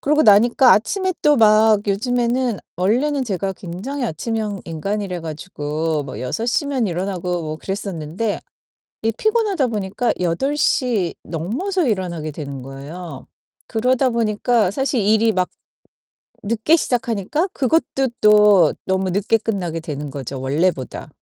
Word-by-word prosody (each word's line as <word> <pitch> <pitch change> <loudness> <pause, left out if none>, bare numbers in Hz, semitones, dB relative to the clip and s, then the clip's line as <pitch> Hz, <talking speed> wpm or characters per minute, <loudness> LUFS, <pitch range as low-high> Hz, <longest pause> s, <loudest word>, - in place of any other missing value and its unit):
그러고 300 +2 +3
나니까 235 +4 +6
아침에 375 - 0
또 295 -1 +5
막 215 -1 +5
요즘에는 240 +2 0 0.2
원래는 255 +9 +1
제가 195 -3 -2
굉장히 210 +11 -5
아침형 215 +1 -3
인간이래 185 +3 -3
가지고 155 -2 -3
뭐 135 - -7
6:00면 240 - -1
일어나고 180 -1 -2
뭐 155 0 -4
그랬었는데 195 +1 -3 0.6
이 225 - +2
피곤하다 420 - +1
보니까 215 +2 -1
8:00 220 - 0
넘어서 265 - -2
일어나게 175 -7 -2
되는 140 -3 -7
거예요. 140 +3 -9 0.4
그러다 255 +3 +2
보니까 225 -2 +1
사실 265 +1 0
일이 220 +2 +3
막 185 -2 0 0.9
늦게 230 +10 +2
시작하니까 245 - -1
그것도 270 -1 +1
또 210 -2 +6
너무 190 0 0
늦게 205 +4 +2
끝나게 185 -7 -3
되는 150 -3 -5
거죠 135 -1 -6
원래보다. 140 0 -1
205 Hz, 290 characters per minute, -20 LUFS, 170-245 Hz, 0.9 s, 나니까